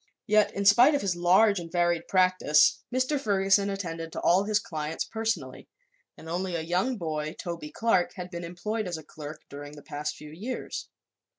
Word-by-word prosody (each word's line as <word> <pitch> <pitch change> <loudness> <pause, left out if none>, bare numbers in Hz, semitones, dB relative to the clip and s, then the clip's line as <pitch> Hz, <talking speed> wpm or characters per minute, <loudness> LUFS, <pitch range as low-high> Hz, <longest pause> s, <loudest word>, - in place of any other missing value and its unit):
Yet, 215 0 +3
in 200 - -2
spite 240 +9 +7
of 285 - 0
his 190 -3 0
large 185 +4 +4
and 165 -1 -8
varied 175 -1 +1
practice, 185 -5 +4
Mr. 255 +3 +1
Ferguson 200 -3 +2
attended 165 -4 -4
to - - -4
all 185 +3 +4
his 210 0 +2
clients 155 -5 -3
personally 220 - -3 0.5
and 160 - -12
only 175 +2 -2
a 165 - -1
young 180 +10 0
boy, 155 -3 -3
Toby 170 -3 -5
Clark, 205 -2 +1
had 180 -1 -7
been 170 -1 -5
employed 205 +5 -3
as 175 -2 -3
a 160 - -10
clerk 150 +1 -9
during 145 +1 -9
the 145 -1 -12
past 150 +1 -4
few 150 0 -11
years. 215 +11 -5
180 Hz, 185 wpm, -27 LUFS, 160-205 Hz, 0.5 s, spite